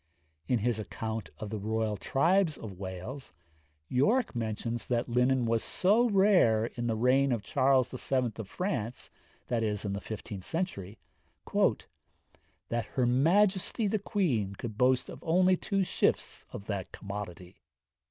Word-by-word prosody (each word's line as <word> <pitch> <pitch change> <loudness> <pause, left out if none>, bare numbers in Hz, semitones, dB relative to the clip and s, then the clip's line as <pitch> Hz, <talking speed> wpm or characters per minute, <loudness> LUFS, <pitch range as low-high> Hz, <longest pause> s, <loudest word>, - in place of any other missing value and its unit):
In 125 - +2
his 115 0 0
account 110 -3 -4
of 105 -1 -6
the 110 - -3
royal 110 +1 -1
tribes 165 - +2
of 100 -5 -9
Wales, 95 +9 -7 0.5
Yorke 210 - +2
mentions 115 +1 -3
that 120 -1 0
linen 125 +1 +2
was 115 0 +1
so 220 +6 +3
rare 190 - +4
in 120 -1 -3
the 115 - 0
reign 130 +4 +3
of 115 -4 -1
Charles 130 +3 +3
VII. 130 -1 -1
of 110 -4 -6
France 125 - -3 0.4
(i.e., 120 - +2 0.3
in 100 -2 -2
the 100 - -4
fifteenth 105 -3 -7
century) 115 - -3 0.6
'that 120 0 -3
her 125 - +3
majesty 185 - +3
the 210 +1 +1
queen 135 - 0
could 110 +1 -6
boast 125 +2 +3
of - - -9
only 185 +2 +4
two 195 +1 0
shifts - - 0
of 100 - -8
that 100 -4 -4
commodity.' 95 -3 -8
120 Hz, 145 wpm, -30 LUFS, 110-160 Hz, 0.6 s, rare